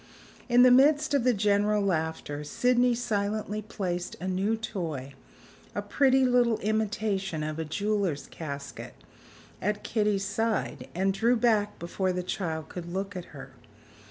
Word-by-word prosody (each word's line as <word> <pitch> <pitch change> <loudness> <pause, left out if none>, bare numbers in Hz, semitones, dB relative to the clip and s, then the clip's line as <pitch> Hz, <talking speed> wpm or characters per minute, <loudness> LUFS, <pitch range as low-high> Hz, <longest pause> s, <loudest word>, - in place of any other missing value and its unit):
In 245 +1 +6
the 255 - +7
midst 290 +3 +5
of 280 -4 +3
the 250 - +4
general 205 +1 +2
laughter, 160 -5 -2
Sydney 245 +9 +2
silently 215 -2 -2
placed 180 -4 -4
a 185 - -4
new 195 +4 0
toy 160 - -5 0.6
(a - - -2
pretty 265 -2 +3
little 245 -3 +3
imitation 205 -5 -1
of 155 +1 -4
a 160 - -2
jeweler's 200 -2 -1
casket) 140 -3 -7 0.7
at 210 +1 -1
Kitty's 210 -3 0
side, 225 +1 -2
and 195 +2 +1
drew 235 +5 +3
back 220 -3 +2
before 185 +2 -2
the 180 0 -2
child 160 -4 -3
could 175 -1 -7
look 195 +2 -3
at 180 - -5
her. - - -11
205 Hz, 145 wpm, -28 LUFS, 175-225 Hz, 0.7 s, the